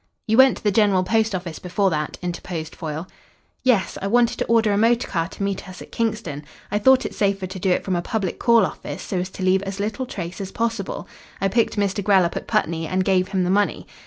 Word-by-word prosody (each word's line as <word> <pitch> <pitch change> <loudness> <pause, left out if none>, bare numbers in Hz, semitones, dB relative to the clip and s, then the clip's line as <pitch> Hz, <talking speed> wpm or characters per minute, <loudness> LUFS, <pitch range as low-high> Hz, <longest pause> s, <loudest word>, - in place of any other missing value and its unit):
"You 220 - +2
went 265 -1 +6
to - - -13
the 205 - +3
General 200 -3 +3
Post 220 +1 +1
Office 175 -3 -5
before 190 +2 0
that," 150 -1 -2
interposed 170 -2 -5
Foyle. 160 +1 -5 0.5
"Yes, 230 -8 +1
I 195 - -1
wanted 235 +2 +2
to - - 0
order 225 -2 +3
a - - +2
motor 230 +3 +3
car 165 -2 -1
to 200 - -7
meet 195 -1 -3
us 185 - -10
at - - -11
Kingston. 210 -11 -2 0.3
I 205 - +1
thought 260 +4 +5
it - - -4
safer 195 -2 0
to 190 +1 -7
do 190 - 0
it 180 - +2
from 185 - -1
a 175 - 0
public 200 -1 -3
call 235 -4 +5
office - - -6
so 185 - -2
as 180 +1 -3
to 190 - -7
leave 185 +1 +3
as 195 0 -5
little 215 +5 -2
trace 180 -1 -6
as 195 -1 -5
possible. 230 -4 -3 0.3
I 195 - +1
picked 230 +3 +1
Mr. 200 -1 0
Grell 190 -2 +4
up 170 - -3
at - - -5
Putney, 165 0 0
and 185 +1 0
gave 185 -1 +2
him 190 -1 0
the 180 - +1
money. 205 +1 +1
195 Hz, 245 wpm, -22 LUFS, 180-215 Hz, 0.5 s, went